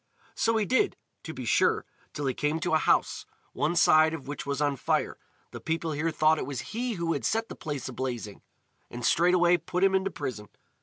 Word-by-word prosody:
So 230 Hz, 0 st, +1 dB
he 215 Hz, -, +1 dB
did, 260 Hz, -, +1 dB, 0.2 s
to -, -, -7 dB
be -, -, -7 dB
sure, -, -, +2 dB, 0.3 s
till 145 Hz, -, -5 dB
he 130 Hz, -, 0 dB
came 150 Hz, +5 st, -1 dB
to 175 Hz, -1 st, -1 dB
a 160 Hz, -, +4 dB
house, -, -, +1 dB, 0.3 s
one 170 Hz, -, 0 dB
side 160 Hz, -1 st, +5 dB
of 140 Hz, -5 st, -10 dB
which 145 Hz, 0 st, -6 dB
was 140 Hz, 0 st, -2 dB
on 145 Hz, -1 st, +1 dB
fire. -, -, -1 dB, 0.3 s
The -, -, -8 dB
people 165 Hz, 0 st, -2 dB
here 155 Hz, +2 st, -1 dB
thought 155 Hz, 0 st, +3 dB
it -, -, -4 dB
was 135 Hz, -, -6 dB
he 240 Hz, +2 st, -2 dB
who 170 Hz, -3 st, -1 dB
had 145 Hz, -, -4 dB
set 225 Hz, +1 st, 0 dB
the -, -, -7 dB
place 145 Hz, -4 st, -5 dB
a 130 Hz, -, -6 dB
blazing, 120 Hz, -5 st, -5 dB, 0.5 s
and 120 Hz, -1 st, -5 dB
straightway 175 Hz, +2 st, +4 dB
put 180 Hz, +1 st, -3 dB
him 195 Hz, 0 st, +4 dB
in 190 Hz, 0 st, +2 dB
prison. 105 Hz, -9 st, -6 dB
160 Hz, 215 wpm, -28 LUFS, 140-180 Hz, 0.5 s, side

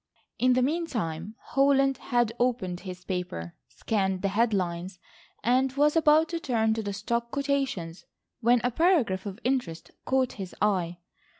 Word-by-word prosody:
In 255 Hz, 0 st, +4 dB
the 255 Hz, 0 st, +2 dB
meantime 225 Hz, -, -2 dB
Holland 275 Hz, 0 st, +2 dB
had 240 Hz, -3 st, 0 dB
opened 230 Hz, -8 st, 0 dB
his 180 Hz, -1 st, -9 dB
paper, 175 Hz, -, -4 dB
scanned 190 Hz, -4 st, -1 dB
the 195 Hz, -, +2 dB
head 225 Hz, +4 st, +2 dB
lines, 180 Hz, -1 st, -2 dB, 0.5 s
and 255 Hz, +2 st, +3 dB
was 295 Hz, +2 st, +3 dB
about 315 Hz, 0 st, +4 dB
to 335 Hz, -, -2 dB
turn 225 Hz, -7 st, +1 dB
to 225 Hz, -, -2 dB
the 205 Hz, -1 st, -4 dB
stock 235 Hz, +4 st, -2 dB
quotations 270 Hz, -, -2 dB, 0.3 s
when 240 Hz, 0 st, +3 dB
a 245 Hz, -, +1 dB
paragraph 245 Hz, -, +2 dB
of 195 Hz, -1 st, -6 dB
interest 245 Hz, -11 st, -2 dB
caught 260 Hz, -1 st, +1 dB
his 190 Hz, -3 st, -7 dB
eye. 185 Hz, -4 st, +1 dB
230 Hz, 155 wpm, -27 LUFS, 185-265 Hz, 0.5 s, In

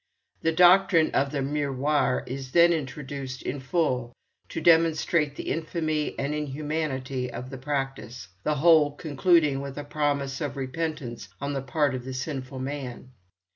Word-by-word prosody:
The 165 Hz, -, +2 dB
doctrine 180 Hz, 0 st, +5 dB
of 140 Hz, 0 st, +1 dB
the 140 Hz, -2 st, -1 dB
'Miroir' 145 Hz, -1 st, 0 dB
is 130 Hz, 0 st, -6 dB
then 170 Hz, 0 st, +6 dB
introduced 135 Hz, -3 st, -5 dB
in 140 Hz, -, -3 dB
full 130 Hz, -4 st, -1 dB, 0.3 s
to -, -, -4 dB
demonstrate 160 Hz, -2 st, +3 dB
the -, -, -4 dB
infamy 155 Hz, -1 st, -2 dB
and 140 Hz, +2 st, -1 dB
inhumanity 145 Hz, -3 st, -3 dB
of 125 Hz, +3 st, -7 dB
the 135 Hz, -, -7 dB
practice, 135 Hz, -5 st, -4 dB
the 150 Hz, +6 st, 0 dB
whole 150 Hz, -1 st, +5 dB
concluding 150 Hz, -2 st, +2 dB
with 140 Hz, 0 st, -7 dB
a 145 Hz, -, -4 dB
promise 145 Hz, -1 st, -1 dB
of 145 Hz, -2 st, -3 dB
repentance 130 Hz, -5 st, -4 dB
on 140 Hz, +1 st, -3 dB
the 135 Hz, -, -2 dB
part 140 Hz, +1 st, +1 dB
of 125 Hz, -1 st, -4 dB
the 130 Hz, 0 st, -6 dB
sinful 130 Hz, -1 st, -4 dB
man. 130 Hz, -2 st, -5 dB
145 Hz, 150 wpm, -26 LUFS, 130-155 Hz, 0.3 s, then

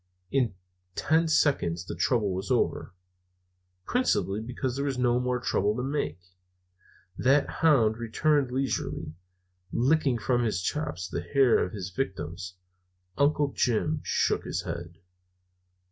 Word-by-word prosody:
In 125 Hz, -8 st, +1 dB, 0.4 s
ten 160 Hz, +2 st, +2 dB
seconds 90 Hz, -, +1 dB
the -, -, -5 dB
trouble 105 Hz, -7 st, +1 dB
was 95 Hz, +1 st, -4 dB
over, -, -, 0 dB, 0.9 s
principally 110 Hz, -, +1 dB
because 125 Hz, +2 st, -3 dB
there 140 Hz, +1 st, -2 dB
was 135 Hz, -2 st, -1 dB
no 125 Hz, -1 st, +2 dB
more 125 Hz, 0 st, 0 dB
trouble 105 Hz, -3 st, 0 dB
to 125 Hz, -, -2 dB
make. 135 Hz, -, -2 dB, 1.0 s
The 135 Hz, +3 st, +4 dB
hound 120 Hz, -9 st, +3 dB
returned 140 Hz, +4 st, +1 dB
leisurely, 125 Hz, -, -2 dB, 0.6 s
licking 135 Hz, 0 st, +2 dB
from 120 Hz, +2 st, +1 dB
his 105 Hz, -6 st, -1 dB
chops 95 Hz, -, -2 dB
the 85 Hz, -, -4 dB
hair 125 Hz, +8 st, +3 dB
of -, -, -5 dB
his 100 Hz, -2 st, -5 dB
victims. 90 Hz, -, -4 dB, 0.6 s
Uncle 145 Hz, 0 st, +2 dB
Jim 145 Hz, +6 st, +1 dB
shook -, -, 0 dB
his -, -, -3 dB
head. 85 Hz, 0 st, -6 dB
125 Hz, 130 wpm, -28 LUFS, 95-140 Hz, 1.0 s, The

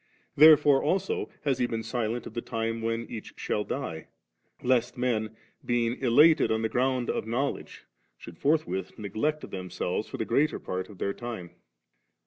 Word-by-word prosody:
Therefore 150 Hz, -2 st, +7 dB
also 410 Hz, -, -1 dB
has 135 Hz, -3 st, 0 dB
He 125 Hz, -, +2 dB
been 115 Hz, -1 st, -3 dB
silent 115 Hz, +1 st, -2 dB
of -, -, -8 dB
the 120 Hz, -, -3 dB
time 115 Hz, 0 st, -3 dB
when 115 Hz, +1 st, -1 dB
each 110 Hz, -3 st, -8 dB
shall 105 Hz, -, -1 dB
die, 100 Hz, -, -5 dB, 0.6 s
lest 125 Hz, -1 st, +1 dB
men, 110 Hz, -3 st, -1 dB, 0.3 s
being 120 Hz, 0 st, +1 dB
elated 145 Hz, +5 st, +5 dB
on 110 Hz, 0 st, 0 dB
the 110 Hz, -, +1 dB
ground 130 Hz, 0 st, 0 dB
of -, -, -2 dB
knowledge, 130 Hz, +5 st, -3 dB, 0.3 s
should 85 Hz, +5 st, -12 dB
forthwith 140 Hz, -, 0 dB
ne^ect 110 Hz, +9 st, -2 dB
themselves 90 Hz, +1 st, -3 dB
for -, -, -6 dB
the 110 Hz, -, -2 dB
greater 145 Hz, +7 st, +2 dB
part 95 Hz, +1 st, -5 dB
of 105 Hz, -, -12 dB
their 100 Hz, +2 st, -1 dB
time. 115 Hz, -8 st, -7 dB
120 Hz, 160 wpm, -28 LUFS, 110-135 Hz, 0.6 s, Therefore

